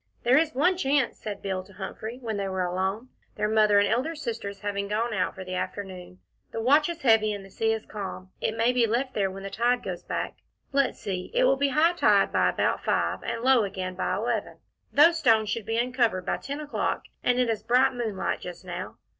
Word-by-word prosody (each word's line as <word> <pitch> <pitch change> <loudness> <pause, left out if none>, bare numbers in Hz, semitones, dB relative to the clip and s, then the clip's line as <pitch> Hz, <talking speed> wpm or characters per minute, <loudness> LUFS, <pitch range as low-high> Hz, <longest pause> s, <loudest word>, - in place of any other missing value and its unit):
"There 255 +4 +5
is 315 -3 0
one 355 +7 +3
chance," 275 -5 +1
said 210 -2 -6
Bill 190 -2 -2
to 195 - -17
Humphrey, 220 +4 -6
when 225 -4 -3
they 200 -1 -2
were 190 -1 -1
alone, 190 +7 -2 0.3
their 210 0 0
Mother 215 -1 +4
and 200 0 +5
elder 255 +10 0
sisters 225 -8 -5
having 200 -1 -2
gone 220 +3 -1
out 185 -3 -1
for 190 - -7
the 185 - -6
afternoon, 185 -1 -5 0.3
"the - - -4
watch 290 +7 +4
is 335 -3 -6
heavy, 220 -3 +4
and 200 -1 -7
the 195 - -15
sea 225 +3 0
is 220 -1 -2
calm. 190 -2 -7
It 220 - -1
may 230 +2 +3
be 240 -2 +3
left 255 +4 -1
there 195 -2 +1
when 195 +1 -8
the 195 - -6
tide 240 +4 +1
goes - - -5
back. - - -4 0.3
Let's 275 -1 +1
see 185 -2 -4
it - - +4
will - - +5
be 280 +1 +1
high 315 +5 +3
tide 345 - +3
by - - +3
about - - 0
five, - - 0
and 230 - -4
low 260 -3 +5
again 190 -2 -4
by - - -1
eleven. - - -2 0.3
Those 330 +3 +6
stones 220 -7 +3
should 225 -1 -3
be 225 0 0
uncovered 235 -6 +1
by - - 0
ten 280 +1 -6
o'clock, 295 -1 -2 0.2
and 245 0 +2
it 250 -1 +2
is 225 -2 -1
bright 250 +2 +3
moonlight 225 -6 -2
just 180 +1 -8
now. 180 +1 -6
225 Hz, 225 wpm, -27 LUFS, 195-255 Hz, 0.3 s, Those